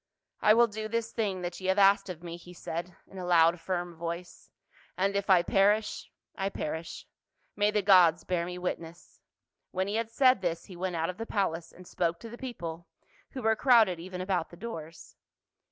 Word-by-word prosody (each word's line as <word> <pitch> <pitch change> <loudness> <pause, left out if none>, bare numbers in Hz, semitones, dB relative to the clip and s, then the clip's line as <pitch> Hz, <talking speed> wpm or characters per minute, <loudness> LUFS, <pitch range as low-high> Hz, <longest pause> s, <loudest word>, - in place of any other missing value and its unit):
" - - -59
I 215 - +6
will 235 +1 +6
do 215 -1 -5
this 230 +1 -2
thing 195 -5 -2
that 175 0 -4
ye 185 - -5
have 190 +1 +2
asked 200 0 +5
of 175 -2 -7
me," 170 -1 -6
he 175 +1 -13
said 170 +1 -5
in 190 - -11
a - - -5
loud 170 -1 +4
firm 175 0 -3
voice, 170 +2 -6 0.3
" - - -29
and 195 +2 +1
if 200 0 -1
I 180 -2 +6
perish, 205 +4 +1 0.3
I 195 0 -1
perish. 160 -2 -5 0.5
May 205 0 +3
the 210 -1 0
gods 180 -4 +6
bear 180 -2 -1
me 180 0 -6
witness 170 -2 -6 0.2
!" - - -58
When 190 +1 -1
he 205 +2 -1
had 230 -1 -2
said 255 -1 +4
this, 170 -2 -2
he 185 - -11
went 180 0 -3
out 165 +2 -1
of 180 - -17
the 225 +1 -5
palace 165 -5 -1
and 180 - -15
spoke 170 -1 -1
to 230 - -9
the 240 - -9
people, 170 -10 -6 0.5
who 260 - -6
were 220 0 +3
crowded 220 -8 +4
even 180 +1 -6
about 185 -3 -1
the 170 - -13
doors. 165 -7 -8
185 Hz, 215 wpm, -29 LUFS, 170-210 Hz, 0.5 s, I